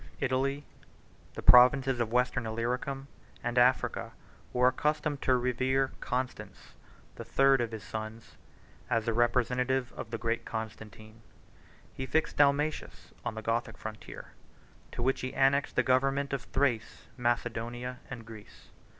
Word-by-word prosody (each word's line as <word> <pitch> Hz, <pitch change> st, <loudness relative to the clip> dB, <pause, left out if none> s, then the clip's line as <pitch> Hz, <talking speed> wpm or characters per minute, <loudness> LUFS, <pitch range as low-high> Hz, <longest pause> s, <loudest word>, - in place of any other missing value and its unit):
Italy, 135 Hz, +2 st, 0 dB, 0.7 s
the 125 Hz, 0 st, +6 dB
Western 125 Hz, 0 st, +1 dB
Illyricum, 125 Hz, +4 st, -3 dB, 0.4 s
and 120 Hz, 0 st, -2 dB
Africa, 125 Hz, +1 st, +2 dB, 0.4 s
were 125 Hz, 0 st, +4 dB
accustomed 150 Hz, 0 st, -1 dB
to 130 Hz, -1 st, +3 dB
revere 130 Hz, +2 st, +1 dB
Constans, 125 Hz, +1 st, -4 dB, 0.4 s
the -, -, -6 dB
third 135 Hz, -1 st, +4 dB
of 115 Hz, -1 st, -2 dB
his 110 Hz, -2 st, -7 dB
sons, 110 Hz, +1 st, -7 dB, 0.5 s
as 115 Hz, -2 st, +1 dB
the 115 Hz, -, 0 dB
representative 125 Hz, +2 st, +1 dB
of -, -, -7 dB
the 115 Hz, -, -3 dB
great 115 Hz, +1 st, -1 dB
Constantine. 110 Hz, 0 st, -7 dB, 0.7 s
He 130 Hz, -, -5 dB
fixed 160 Hz, +5 st, 0 dB
Dalmatius 145 Hz, +2 st, +1 dB
on -, -, -3 dB
the 110 Hz, -, -6 dB
Gothic 115 Hz, +1 st, -1 dB
frontier, 110 Hz, 0 st, -9 dB, 0.6 s
to 120 Hz, -, -4 dB
which 135 Hz, +2 st, +1 dB
he 130 Hz, -, -4 dB
annexed 140 Hz, +1 st, +2 dB
the 130 Hz, -, +3 dB
government 135 Hz, +2 st, +1 dB
of 135 Hz, -, -3 dB
Thrace, 125 Hz, -5 st, -1 dB
Macedonia, 120 Hz, 0 st, -2 dB
and 115 Hz, -4 st, -7 dB
Greece. 110 Hz, -2 st, -13 dB
125 Hz, 130 wpm, -30 LUFS, 115-135 Hz, 0.7 s, the